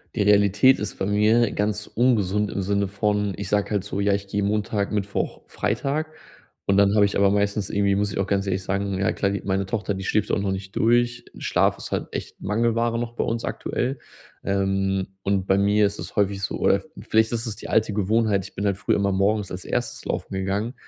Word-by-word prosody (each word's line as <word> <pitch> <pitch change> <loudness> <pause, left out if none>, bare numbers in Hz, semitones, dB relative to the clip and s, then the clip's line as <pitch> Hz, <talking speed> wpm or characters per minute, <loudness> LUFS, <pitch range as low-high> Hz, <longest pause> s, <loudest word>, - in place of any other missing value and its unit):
Die 105 - 0
Realität 100 +5 +5
ist 105 - -4
bei 95 - -1
mir 105 +2 +3
ganz 105 0 -1
ungesund 105 -4 +1
im 100 - -3
Sinne 100 +1 0
von 105 0 0
ich 100 - -6
sage 105 -1 +1
halt 100 -2 0
so: 100 -1 -4
„Ja, 100 0 +2
ich 100 0 -2
gehe 100 0 -1
Montag, 105 0 -1
Mittwoch, 100 -1 -2
Freitag.” 140 +9 -1 0.6
Und 100 0 +3
dann 100 +1 +4
habe 105 - +5
ich 100 - -1
aber 100 0 +4
meistens 100 0 0
irgendwie 100 -1 +2
muss 100 0 0
ich - - -4
auch 100 - +1
ganz 100 0 0
ehrlich 95 0 -1
sagen, 100 +1 -1
ja, 95 - +1
klar, 100 - 0
die 100 - -3
meine 95 0 0
Tochter, 105 0 -2
die 95 0 -5
schläft 105 -1 0
auch - - +1
noch 100 -1 -1
nicht 95 0 -7
durch. 120 +1 +2
Schlaf - - +1
ist - - -8
halt - - -2
echt - - -6
Mangelware 115 +2 +1
noch 115 0 -3
bei - - -1
uns 115 0 -2
aktuell. 135 +2 -2 0.5
Ähm, 95 -1 0 0.2
und 100 -1 0
bei 95 - +3
mir 105 +1 +3
ist 100 0 -2
es - - -7
häufig 100 -1 +1
so, - - -2
oder - - +3
v - - -17 0.2
vielleicht 110 +1 +3
ist 115 +1 -2
es 110 -2 -4
die - - -8
alte 110 -1 +2
Gewohnheit, 105 -1 +1
ich - - -12
bin 100 - -2
halt 100 -1 +1
früher - - +1
immer 100 0 +1
morgens 100 +1 +1
als 90 0 -6
1. - - -3
laufen - - -3
gegangen. 100 +5 -2
100 Hz, 225 wpm, -24 LUFS, 100-105 Hz, 0.6 s, Realität